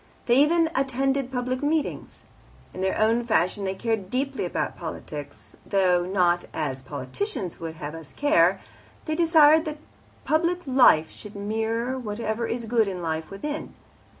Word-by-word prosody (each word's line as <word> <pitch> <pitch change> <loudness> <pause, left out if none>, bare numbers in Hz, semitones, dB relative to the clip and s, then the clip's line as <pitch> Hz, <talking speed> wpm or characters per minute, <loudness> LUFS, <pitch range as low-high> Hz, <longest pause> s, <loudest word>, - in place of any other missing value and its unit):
They 240 - +3
even 325 +4 +4
attended 270 0 0
public 255 0 -2
meetings. 300 +1 -2 0.5
In 185 - -6
their 190 0 0
own 225 +2 +3
fashion 200 -3 +1
they 190 0 -2
cared 220 -2 -2
deeply 270 +4 -1
about - - -2
politics, - - -8
though 180 -3 +2
not 175 -2 +2
as 135 -4 -2
politicians 200 - -4
would 165 -1 -6
have 150 -1 -6
us 160 -4 -9
care; 290 +2 +3 0.4
they 310 - -1
desired 315 -1 +5
that 305 -1 -4 0.5
public 340 +3 +1
life 250 - +5
should 210 -1 -11
mirror 225 +5 -2
whatever 220 0 -3
is 235 0 -3
good 225 -1 +2
in 190 -2 -3
the 175 - -7
life 160 -1 -3
within. 295 +10 -5
230 Hz, 150 wpm, -25 LUFS, 190-280 Hz, 0.5 s, desired